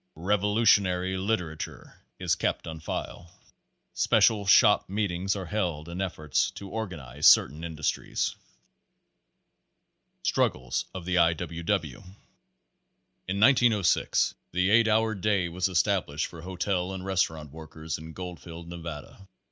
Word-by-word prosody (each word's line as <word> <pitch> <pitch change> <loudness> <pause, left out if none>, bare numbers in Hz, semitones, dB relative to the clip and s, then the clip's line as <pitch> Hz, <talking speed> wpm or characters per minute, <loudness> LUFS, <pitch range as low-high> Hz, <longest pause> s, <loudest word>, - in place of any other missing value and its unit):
Revolutionary 100 0 +2
liter 95 -5 -1
ature - - -8 0.2
is - - 0
kept - - -1
on 80 -1 -7
file. 80 +2 -5
Page - - -20
Nineteen - - -29 0.5
Special 105 -3 +3
shop 105 0 +5
meetings 95 -1 -1
are 95 -2 -5
held 85 -6 -2
in 85 +2 -5
efforts 75 -7 -1
to 100 - -10
organ 105 -7 -4
ize 70 +2 0
certain 75 +5 +5
industries. 80 -3 -2 1.9
Struggles 65 0 0
of 90 -2 -6
the 90 0 +1
I. 85 -1 +5
W. 85 0 -6
W. 85 - -1 1.3
In 95 +2 -2
1906 115 - +3 0.2
the 90 +3 +1
eight 115 +1 +5
hour 110 0 +2
day 100 -2 0
was 85 +2 -1
established 75 -4 0
for 85 - -10
hotel 95 +1 -2
and 95 0 -6
restaurant 80 -6 -1
workers 80 0 -7
in 80 0 -10
Gbldfield, 85 -2 -8
Nevada. 85 +2 -9
90 Hz, 130 wpm, -27 LUFS, 80-100 Hz, 1.9 s, shop